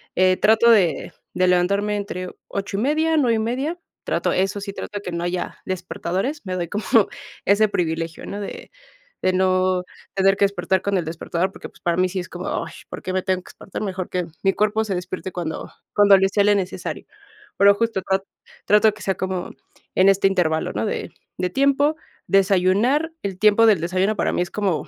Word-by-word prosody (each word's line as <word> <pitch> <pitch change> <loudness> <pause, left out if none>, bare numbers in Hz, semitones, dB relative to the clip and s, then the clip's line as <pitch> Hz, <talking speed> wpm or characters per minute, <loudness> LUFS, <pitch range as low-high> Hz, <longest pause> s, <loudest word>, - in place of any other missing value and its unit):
Eh, 185 0 +4
trato 225 +2 +5
de 175 -10 +2 0.2
de 185 - +2
levantarme 200 +4 +2
entre 185 -3 -4 0.2
8:30 280 +12 0
9:30 250 +6 0 0.3
trato - - 0
eso 195 +2 0
sí 200 0 -6
trato 205 - -6
que 180 - -6
no 170 0 -3
haya 175 0 -3
despertadores, 190 - -3
me 185 -2 -4
doy 175 -2 -2
como 210 +4 -4 0.6
ese 210 +2 +4
privilegio, 165 -3 -2
¿no?, 205 - -5
de 200 - -8 0.5
de 185 - +2
no 185 0 +2 0.3
tener 195 0 +3
que 200 - +4
despertar 190 -1 0
con 200 -1 0
el 175 - 0
despertador, 170 +3 -2
porque, - - -9
pues, - - -22
para 170 -1 0
mí 185 0 +3
sí 185 +1 -4
es 175 - -6
como, - - -6 0.2
ash, - - -12
¿por - - -7
qué 185 - -3
me 185 0 0
tengo 185 -1 -1
que - - -15
espantar?, 195 - -8
mejor 190 -3 -3
que 180 -1 -2 0.2
mi 195 - +3
cuerpo 215 +1 +1
se 195 -3 -2
despierte 185 +1 -5
cuando 165 -3 -4 0.2
cuando 205 -1 +7
le 195 0 +2
sea 200 0 +2
le 205 0 +5
necesario. 190 -2 -4 0.5
Pero 200 0 +6
justo 225 -2 0
trat 190 +1 0 0.4
trato 210 +1 +5
de 215 - +3
que 210 - -14
sea 190 -1 -1
como 185 -1 -3 0.4
en 190 +1 +5
este 195 0 +4
intervalo, 160 -5 0
¿no?, - - -1
de - - -4 0.3
de 180 0 -1
tiempo, 280 - +2 0.3
desayunar 195 - +3
el 195 -2 -3
tiempo 215 +2 +5
del 200 -7 +4
desayuno 185 +5 0
para - - 0
mí - - 0
es 180 - -2
como, 195 -6 -1
195 Hz, 195 wpm, -22 LUFS, 185-210 Hz, 0.6 s, cuando